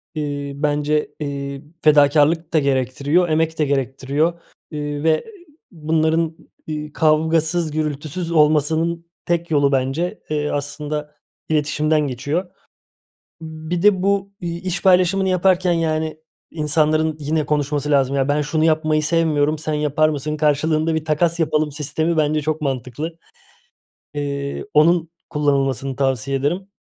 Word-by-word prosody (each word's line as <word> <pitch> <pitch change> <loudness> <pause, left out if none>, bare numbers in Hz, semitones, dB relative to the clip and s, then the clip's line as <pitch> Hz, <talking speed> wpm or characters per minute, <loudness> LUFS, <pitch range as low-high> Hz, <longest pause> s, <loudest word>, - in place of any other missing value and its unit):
Eee, 145 -2 -3
bence, 150 +1 0
eee, 140 -1 -4 0.2
fedakârlık 150 +2 +4
da 155 - +5
gerektiriyor, 140 +5 +1
emek 160 +1 0
de 150 - +3
gerektiriyor. 140 +4 0 0.4
Eee, 145 -1 -4
ve 160 -1 +2 0.5
bunların, 160 0 0 0.3
ııı, 150 -1 -5
kavgasız, 160 +1 +2
gürültüsüz 155 +3 -3
olmasının 160 +2 +2 0.2
tek 170 -1 -1
yolu 145 -2 +3
bence, 135 +9 -1
eee, 150 -1 -1
aslında 150 +1 -4 0.3
iletişimden 150 0 +1
geçiyor. 145 +8 -2 1.0
Imm, 160 0 -9
bir 175 0 -1
de 205 -3 +4
bu, 200 0 0
iii, 170 -1 -4
iş 185 -1 -3
paylaşımını 190 0 +3
yaparken, 185 -1 +2
yani, 160 -1 -1 0.3
insanların, 155 0 +1
yine, 150 +1 -1
konuşması 145 0 -1
lazım. 140 -1 +2
"Ya, 135 0 +1
ben 145 +1 +2
şunu 155 +1 0
yapmayı 155 -1 +2
sevmiyorum, 155 -2 +1
sen 155 -1 -2
yapar 150 +1 +2
mısın? 150 0 -3
Karşılığında 155 +2 +1
bir 160 - -2
takas 165 +2 +1
yapalım." 155 -2 +1
sistemi 155 +3 -1
bence 155 0 +2
çok 155 +1 -2
mantıklı. 140 +4 -4 1.0
Eee, 140 -1 -3
onun 165 +2 +4 0.2
kullanılmasını 135 -3 0
tavsiye 135 0 0
ederim 175 +8 -2
155 Hz, 130 wpm, -20 LUFS, 145-160 Hz, 1.0 s, da